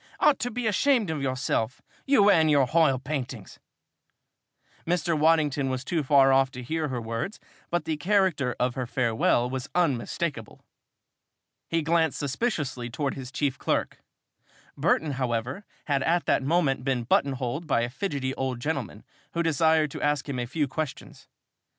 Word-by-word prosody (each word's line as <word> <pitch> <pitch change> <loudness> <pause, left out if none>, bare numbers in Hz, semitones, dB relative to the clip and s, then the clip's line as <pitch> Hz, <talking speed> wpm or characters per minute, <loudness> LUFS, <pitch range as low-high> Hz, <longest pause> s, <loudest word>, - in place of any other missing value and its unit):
"Ought 300 -2 +4
to 245 - -1
be 245 0 -4
ashamed 220 - +2
of 155 -3 -3
yourself! 130 -3 -1 0.3
You 210 -7 +5
and 160 -4 +4
your 145 -3 +4
h'oil 155 -1 +3
paintings!" 130 -7 -5 1.3
Mr. 170 -1 +1
Waddington 150 -3 +2
was 130 0 -3
too 170 -3 0
far 135 -1 +5
off 135 0 +4
to 125 -1 -7
hear 155 +4 -2
her 130 -3 -3
words 115 - -4 0.3
but 175 -2 -1
the 160 -1 -2
character 175 -8 +1
of 125 0 +1
her 125 -1 -4
farewell 120 0 +1
was 130 0 -5
unmistakable! 145 -5 -2 1.0
He 165 -1 0
glanced 160 -1 +2
suspiciously 140 - -2
towards 140 +3 -2
his 130 -1 -8
chief 140 -3 -1
clerk. - - -1 0.8
Burton, 155 -2 +1
however, 125 - -2 0.2
had 140 -2 +1
at 170 +5 +1
that - - +2
moment 135 -3 +1
been 130 -3 0
button 140 +4 +2
holed 135 +6 -4
by 125 -5 +2
a 120 - -1
fidgety 140 -5 -3
old 130 -2 -3
gentleman 135 -7 -4 0.3
who 170 - 0
desired 160 -1 +2
to - - -7
ask 145 -1 0
him 135 -3 -3
a 120 - -3
few 145 +3 -1
questions. 150 +2 -6
140 Hz, 160 wpm, -26 LUFS, 130-165 Hz, 1.3 s, You